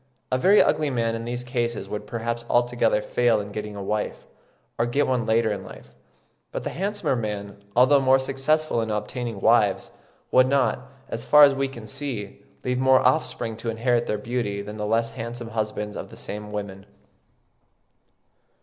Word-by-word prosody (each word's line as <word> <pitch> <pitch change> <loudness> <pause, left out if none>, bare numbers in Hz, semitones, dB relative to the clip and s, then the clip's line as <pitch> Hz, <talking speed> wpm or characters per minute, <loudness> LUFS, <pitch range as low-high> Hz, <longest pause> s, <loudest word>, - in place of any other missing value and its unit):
A 130 - +3
very 200 +8 +6
ugly 150 -1 +1
man 115 -3 0
in 115 0 -4
these 120 +1 -3
cases 120 -2 -2
would 105 0 -5
perhaps 115 +1 -3
altogether 120 -3 +2
fail 120 -3 +2
in 100 0 -6
getting 105 0 -5
a 100 - -5
wife, 105 +2 -3 0.5
or 115 - +2
get 140 +4 +1
one 125 -3 0
later 110 0 +2
in 100 -2 -4
life; - - -13 0.6
but - - -4
the - - -3
handsomer 200 -5 -1
men, 100 -3 -5
although 130 +4 +6
more 130 0 +5
successful 135 0 0
in 110 - -3
obtaining 115 +1 -3
wives, 110 -2 +3 0.4
would 130 0 +5
not, 140 0 +2 0.3
as - - -5
far 150 0 +7
as 140 -1 +7
we 135 0 0
can 120 -5 -10
see, 110 -4 -6 0.2
leave 125 0 -1
more 130 0 +5
offspring 115 -7 0
to 115 +1 -4
inherit 120 +1 +1
their 105 - 0
beauty 105 -2 -2
than 105 +1 -8
the 105 0 -3
less 115 +1 +1
handsome 115 +1 -6
husbands 105 -2 -3
of - - -6
the - - -13
same 105 0 -6
women. 100 -1 -6
115 Hz, 175 wpm, -24 LUFS, 105-130 Hz, 0.6 s, far